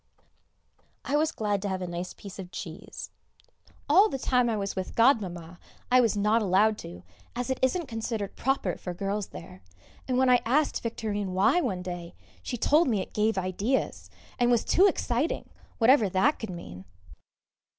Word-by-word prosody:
I 280 Hz, -, 0 dB
was 310 Hz, +1 st, +2 dB
glad 205 Hz, -2 st, -1 dB
to 200 Hz, -, -2 dB
have 190 Hz, -1 st, -2 dB
a 185 Hz, -, -4 dB
nice 175 Hz, +1 st, -5 dB
piece 200 Hz, -1 st, -11 dB
of 185 Hz, -2 st, -7 dB
cheese. 165 Hz, 0 st, -8 dB, 0.8 s
All 385 Hz, +9 st, +6 dB
the 270 Hz, -, -3 dB
time 250 Hz, -2 st, +2 dB
I 220 Hz, -, 0 dB
was 200 Hz, -1 st, -3 dB
with 190 Hz, -1 st, -5 dB
Godmamma 180 Hz, -9 st, +1 dB, 0.3 s
I 255 Hz, 0 st, +7 dB
was 225 Hz, -3 st, +1 dB
not 210 Hz, +3 st, +3 dB
allowed 210 Hz, +2 st, +3 dB
to, 90 Hz, +1 st, -9 dB, 0.3 s
as 245 Hz, +2 st, -2 dB
it 260 Hz, -, -2 dB
isn't 315 Hz, +7 st, +1 dB
considered 225 Hz, -3 st, -4 dB
proper 260 Hz, -9 st, -1 dB
for 180 Hz, -1 st, -6 dB
girls 200 Hz, +2 st, -2 dB
there, 90 Hz, +2 st, -11 dB, 0.5 s
and 255 Hz, -1 st, 0 dB
when 260 Hz, 0 st, +3 dB
I 250 Hz, -1 st, +5 dB
asked 285 Hz, +6 st, +1 dB
Victorine 210 Hz, -4 st, -3 dB
why 205 Hz, -, +3 dB
one 190 Hz, -, -2 dB
day, 175 Hz, -1 st, -7 dB, 0.3 s
she 245 Hz, -, -4 dB
told 300 Hz, +8 st, +3 dB
me 220 Hz, -5 st, +1 dB
it 185 Hz, -, -6 dB
gave 215 Hz, 0 st, +1 dB
ideas, 195 Hz, +8 st, -1 dB, 0.3 s
and 245 Hz, 0 st, +3 dB
was 240 Hz, -2 st, +2 dB
too 385 Hz, +3 st, +5 dB
exciting, 280 Hz, -4 st, -1 dB, 0.3 s
whatever 230 Hz, -3 st, +5 dB
that 215 Hz, +12 st, +2 dB
could 220 Hz, -, -5 dB
mean. 95 Hz, -, -9 dB
215 Hz, 175 wpm, -27 LUFS, 185-255 Hz, 0.8 s, I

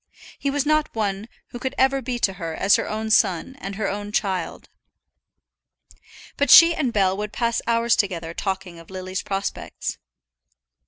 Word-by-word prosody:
He 280 Hz, -, -1 dB
was 280 Hz, 0 st, 0 dB
not 305 Hz, -2 st, +1 dB
one 205 Hz, 0 st, -2 dB, 0.2 s
who 240 Hz, -, -8 dB
could 260 Hz, +2 st, -4 dB
ever 270 Hz, +1 st, +3 dB
be 250 Hz, 0 st, -3 dB
to 195 Hz, -5 st, +1 dB
her 165 Hz, -1 st, -4 dB
as 195 Hz, -, +4 dB
her -, -, -2 dB
own 220 Hz, +1 st, -3 dB
son 200 Hz, +4 st, +2 dB
and 195 Hz, +1 st, -6 dB
her 215 Hz, -1 st, -2 dB
own 205 Hz, +1 st, -4 dB
child. 190 Hz, -5 st, -2 dB, 1.7 s
But 285 Hz, -, +1 dB
she 335 Hz, 0 st, +9 dB
and 270 Hz, -7 st, -1 dB
Bell 190 Hz, -3 st, +2 dB
would 210 Hz, 0 st, -4 dB
pass 235 Hz, +1 st, -1 dB
hours 235 Hz, 0 st, +3 dB
together 170 Hz, -5 st, -2 dB
talking 190 Hz, -2 st, -4 dB
of 165 Hz, -, -15 dB
Lily's 185 Hz, 0 st, -5 dB
prospects. 195 Hz, 0 st, -4 dB
210 Hz, 165 wpm, -23 LUFS, 190-245 Hz, 1.7 s, she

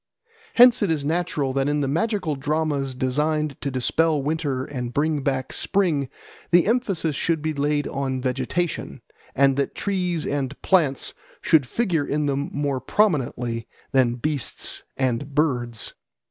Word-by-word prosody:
Hence 245 Hz, 0 st, +7 dB
it 205 Hz, -, +2 dB
is 150 Hz, -3 st, 0 dB
natural 155 Hz, -4 st, 0 dB
that 135 Hz, +1 st, +1 dB
in 145 Hz, 0 st, +1 dB
the 140 Hz, -, 0 dB
magical 185 Hz, -, 0 dB
dramas 145 Hz, -1 st, -1 dB
designed 150 Hz, +3 st, 0 dB
to 140 Hz, -, -1 dB
dispel 150 Hz, +5 st, +1 dB
winter 140 Hz, -2 st, -1 dB
and 125 Hz, -4 st, -5 dB
bring 150 Hz, 0 st, +1 dB
back 135 Hz, -1 st, -2 dB
spring 165 Hz, -9 st, +1 dB, 0.4 s
the 175 Hz, -1 st, +5 dB
emphasis 195 Hz, -, 0 dB
should 160 Hz, -1 st, 0 dB
be 155 Hz, 0 st, 0 dB
laid 145 Hz, 0 st, 0 dB
on 135 Hz, -1 st, -2 dB
vegetation, 135 Hz, +7 st, -2 dB, 0.3 s
and 135 Hz, 0 st, +4 dB
that 140 Hz, -, -1 dB
trees 180 Hz, -5 st, -1 dB
and 140 Hz, -1 st, -2 dB
plants 155 Hz, -9 st, +2 dB, 0.3 s
should 150 Hz, -5 st, +3 dB
figure 170 Hz, -, 0 dB
in 150 Hz, +1 st, 0 dB
them 140 Hz, 0 st, -1 dB
more 140 Hz, -2 st, -1 dB
prominently 125 Hz, -, 0 dB, 0.2 s
than 130 Hz, -3 st, +3 dB
beasts 145 Hz, 0 st, -2 dB, 0.2 s
and 130 Hz, +2 st, -1 dB
birds. 125 Hz, -7 st, 0 dB
145 Hz, 145 wpm, -24 LUFS, 135-160 Hz, 0.4 s, Hence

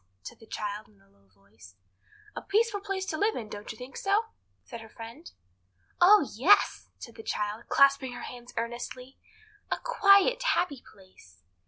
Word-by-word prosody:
said -, -, -10 dB
the 225 Hz, -, -16 dB
child 210 Hz, 0 st, -5 dB
in 100 Hz, -, -26 dB
a 95 Hz, -, -27 dB
low 100 Hz, 0 st, -30 dB
voice. 100 Hz, 0 st, -19 dB, 0.6 s
"A -, -, -5 dB
peaceful 420 Hz, 0 st, +1 dB
place 390 Hz, -1 st, -3 dB
to 315 Hz, -4 st, -4 dB
live 430 Hz, +2 st, +1 dB
in; 220 Hz, -3 st, -6 dB
don't 205 Hz, 0 st, -7 dB
you 220 Hz, -, -11 dB
think 250 Hz, +2 st, -10 dB
so?" 400 Hz, +3 st, +1 dB, 0.4 s
said 235 Hz, -3 st, -9 dB
her 225 Hz, -, -12 dB
friend. 230 Hz, +9 st, -11 dB, 0.7 s
"Oh 375 Hz, -4 st, +7 dB
yes!" 335 Hz, -, +3 dB
said 235 Hz, -, -11 dB
the -, -, -10 dB
child, 210 Hz, +1 st, -3 dB
clasping 275 Hz, -2 st, +4 dB
her -, -, -8 dB
hands 245 Hz, -1 st, -9 dB
earnestly; 240 Hz, +3 st, -6 dB, 0.5 s
"a -, -, 0 dB
quiet, 470 Hz, 0 st, +4 dB
happy 300 Hz, -, 0 dB
place." 185 Hz, -, -20 dB
245 Hz, 170 wpm, -28 LUFS, -, 0.7 s, Oh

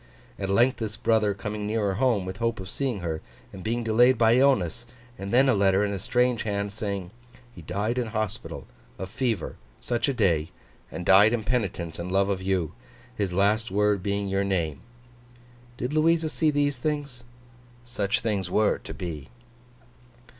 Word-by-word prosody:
At 95 Hz, -1 st, -3 dB
length 120 Hz, +6 st, +3 dB
this 110 Hz, -2 st, -4 dB
brother 110 Hz, -3 st, +2 dB
coming 105 Hz, +1 st, -4 dB
nearer 105 Hz, -2 st, 0 dB
home, 115 Hz, -3 st, +1 dB
with 95 Hz, +1 st, -6 dB
hope 115 Hz, -2 st, -1 dB
of 95 Hz, +1 st, -7 dB
seeing 130 Hz, -8 st, -2 dB
her, 80 Hz, -2 st, -3 dB, 0.3 s
and 95 Hz, -, -9 dB
being 120 Hz, +2 st, -1 dB
delayed 120 Hz, +3 st, +4 dB
by 115 Hz, -1 st, +5 dB
illness; 120 Hz, -, +2 dB, 0.3 s
and 100 Hz, +1 st, -5 dB
then 130 Hz, +3 st, +5 dB
a 130 Hz, -, +5 dB
letter, 100 Hz, 0 st, +3 dB
in 100 Hz, -, -2 dB
a 100 Hz, -, -3 dB
strange 125 Hz, +3 st, +1 dB
hand, 100 Hz, -1 st, -2 dB
saying 100 Hz, -3 st, -4 dB, 0.4 s
'he 85 Hz, -, -11 dB
died 100 Hz, +9 st, -2 dB
in 120 Hz, -, -1 dB
hospital, 110 Hz, -2 st, -4 dB, 0.3 s
of 95 Hz, +1 st, -6 dB
fever, 120 Hz, -5 st, -2 dB, 0.2 s
such 120 Hz, +3 st, -1 dB
a -, -, +1 dB
day, 85 Hz, -8 st, +2 dB, 0.4 s
and 90 Hz, -, -6 dB
died 105 Hz, +4 st, +6 dB
in 115 Hz, -2 st, -1 dB
penitence 95 Hz, -9 st, -2 dB
and 90 Hz, +1 st, -4 dB
love 100 Hz, +1 st, +2 dB
of 95 Hz, -2 st, -1 dB
you: 95 Hz, -4 st, 0 dB, 0.4 s
his 100 Hz, -5 st, -1 dB
last 105 Hz, +5 st, +2 dB
word 105 Hz, 0 st, +2 dB
being 100 Hz, +1 st, -1 dB
your 95 Hz, 0 st, 0 dB
name'? 85 Hz, -7 st, -1 dB, 1.0 s
Did 125 Hz, +4 st, -3 dB
Louisa 160 Hz, +1 st, +3 dB
see 155 Hz, 0 st, +1 dB
these 145 Hz, -2 st, +1 dB
things? 140 Hz, -4 st, -3 dB, 0.6 s
Such 105 Hz, -5 st, -1 dB
things 100 Hz, -5 st, -1 dB
were 105 Hz, +3 st, +2 dB
to -, -, -9 dB
be. 80 Hz, -6 st, -6 dB
105 Hz, 175 wpm, -26 LUFS, 95-120 Hz, 1.0 s, died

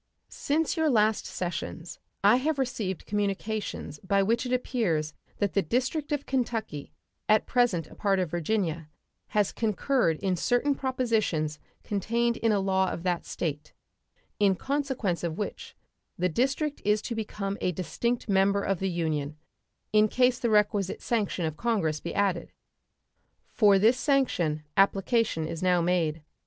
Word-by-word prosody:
Since 310 Hz, +4 st, -1 dB
your 320 Hz, -1 st, +3 dB
last 220 Hz, -3 st, +2 dB
sessions 175 Hz, -1 st, -5 dB, 0.2 s
I 205 Hz, +4 st, +6 dB
have 295 Hz, +3 st, 0 dB
received 225 Hz, -8 st, -2 dB
communications 205 Hz, -5 st, -3 dB
by 195 Hz, +1 st, +1 dB
which 230 Hz, +5 st, +1 dB
it -, -, -4 dB
appears 190 Hz, -, 0 dB, 0.2 s
that 205 Hz, -2 st, 0 dB
the 200 Hz, -, +3 dB
district 260 Hz, -, -1 dB
of 290 Hz, -1 st, -1 dB
Kentucky, 225 Hz, -, -2 dB, 0.4 s
at 215 Hz, 0 st, +4 dB
present 240 Hz, -10 st, +2 dB
a -, -, -15 dB
part 200 Hz, -2 st, +1 dB
of 180 Hz, -4 st, -1 dB
Virginia, 170 Hz, -3 st, -1 dB, 0.4 s
has 205 Hz, -2 st, +1 dB
concurred 220 Hz, -, +1 dB
in 190 Hz, 0 st, 0 dB
certain 245 Hz, -, +1 dB
propositions 225 Hz, -, -1 dB, 0.2 s
contained 235 Hz, +4 st, 0 dB
in 225 Hz, -, +1 dB
a 205 Hz, -, +2 dB
law 190 Hz, -1 st, +1 dB
of 170 Hz, -, -5 dB
that 180 Hz, -2 st, -1 dB
State, 150 Hz, -3 st, -4 dB, 0.7 s
in 200 Hz, -2 st, +4 dB
consequence 265 Hz, -10 st, -2 dB
of 165 Hz, -2 st, -2 dB
which 210 Hz, -, -5 dB, 0.4 s
the 180 Hz, +1 st, +1 dB
district 275 Hz, -, 0 dB
is 210 Hz, +1 st, +2 dB
to 235 Hz, -, -3 dB
become 210 Hz, -3 st, -3 dB
a 180 Hz, -, +1 dB
distinct 235 Hz, +8 st, -2 dB
member 200 Hz, 0 st, +3 dB
of 195 Hz, -3 st, 0 dB
the 195 Hz, -, 0 dB
Union, 155 Hz, -4 st, -2 dB, 0.6 s
in 215 Hz, 0 st, +5 dB
case 250 Hz, +2 st, +2 dB
the 235 Hz, -, 0 dB
requisite 210 Hz, -2 st, +1 dB
sanction 205 Hz, -7 st, 0 dB
of 155 Hz, -1 st, -3 dB
Congress 195 Hz, -11 st, 0 dB
be 170 Hz, -, -6 dB
added. 190 Hz, -4 st, 0 dB, 1.0 s
For 205 Hz, -3 st, +5 dB
this 225 Hz, +6 st, +4 dB
sanction 180 Hz, -, +1 dB
application 195 Hz, -3 st, +2 dB
is 160 Hz, -, -5 dB
now 180 Hz, -1 st, +3 dB
made. 165 Hz, -3 st, 0 dB
200 Hz, 150 wpm, -28 LUFS, 175-235 Hz, 1.0 s, I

